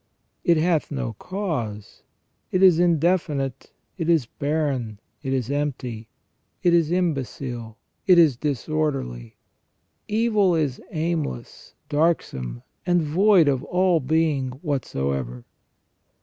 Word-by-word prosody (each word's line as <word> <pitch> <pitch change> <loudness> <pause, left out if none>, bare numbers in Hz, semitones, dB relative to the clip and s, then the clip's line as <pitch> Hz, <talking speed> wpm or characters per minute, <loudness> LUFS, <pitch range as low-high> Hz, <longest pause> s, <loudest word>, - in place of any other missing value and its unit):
It 170 -1 +4
hath 160 -1 +1
no 135 -5 -3
cause; 145 - -4 0.5
it 185 +1 +2
is 180 -3 +7
indefinite, 165 -5 +1 0.3
it 165 0 -1
is 160 -7 +3
barren, 140 -6 -2 0.2
it 135 -3 -3
is 130 -1 -1
empty, 125 -6 -3 0.6
it 175 - +4
is 165 -3 +3
imbecile, 130 -9 -2 0.3
it 180 -2 +7
is 160 -6 +6
disorderly. 140 - -2 0.7
Evil 210 -4 +2
is 145 -5 -1
aimless, 155 - -4
darksome, 65 - -1 0.2
and 175 -2 +2
void 180 +2 +4
of 135 -2 +1
all 180 -2 +2
being 150 -2 +1
whatsoever." 70 - -2
150 Hz, 105 wpm, -24 LUFS, 125-170 Hz, 0.7 s, is